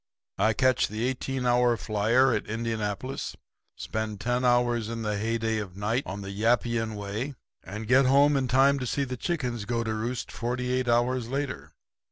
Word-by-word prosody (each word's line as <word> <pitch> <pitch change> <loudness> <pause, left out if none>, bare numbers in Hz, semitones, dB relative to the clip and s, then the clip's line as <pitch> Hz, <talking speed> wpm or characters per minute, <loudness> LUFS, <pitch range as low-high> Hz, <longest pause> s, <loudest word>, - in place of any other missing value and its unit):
'I 110 - +3
catch 130 +3 +3
the 110 +2 -4
eighteen 130 0 -2
hour 120 -1 +3
flyer 115 +6 +2
at 110 - -2
Indianapolis, 110 +2 -3 0.4
spend 110 -2 -4
ten 125 +3 0
hours 120 -2 +2
in 115 -1 -4
the 105 -1 -1
heyday 110 +1 -1
of 95 -3 -7
night 110 +5 0
on 100 +1 -5
the 100 0 -6
Yappian 115 +1 +1
Way, 105 +7 -4 0.3
and 105 +4 -7
get 130 +2 +5
home 140 +2 +5
in 135 -2 +1
time 135 +3 +4
to 125 - -3
see 140 - 0
the 130 -1 -4
chickens 125 - -2
go 115 +1 -1
to 110 -1 -2
roost 115 +3 -3
forty 125 +1 -2
eight 130 -1 0
hours 120 0 +2
later. 140 0 -4
120 Hz, 180 wpm, -27 LUFS, 110-130 Hz, 0.4 s, get